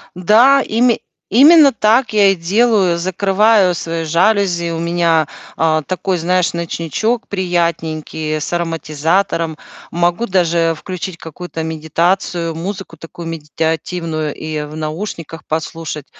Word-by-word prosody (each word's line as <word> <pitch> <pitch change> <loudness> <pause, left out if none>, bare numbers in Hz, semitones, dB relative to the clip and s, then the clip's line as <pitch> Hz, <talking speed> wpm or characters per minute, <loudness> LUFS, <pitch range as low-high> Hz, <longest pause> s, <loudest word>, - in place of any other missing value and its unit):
Да, 230 +10 +5
име 235 +1 +2 0.3
именно 290 +4 +7
так 230 +2 +2
я 205 -2 +5
и - - 0
делаю. 190 0 +2
Закрываю 195 +1 +2
свои 165 0 -4
жалюзи. 175 0 +1
У 165 - -3
меня, 170 -2 +1 0.3
а, 155 -1 +2
такой, 185 +2 -2
знаешь, 180 +1 +1
ночничок 170 - -2
приятненький 165 -4 -2
с 150 - -5
ароматизатором. 165 0 -1 0.3
Могу 175 +7 0
даже 170 -3 +1
включить 185 -1 -6
какую-то 165 0 -7
медитацию, 165 +2 -1
музыку 185 +1 -6
такую 165 +1 -9
медитативную 160 0 -3
и 155 -1 -4
в 150 +1 -8
наушниках 160 +1 -6
послушать. 155 -1 -4
170 Hz, 115 wpm, -16 LUFS, 160-195 Hz, 0.3 s, именно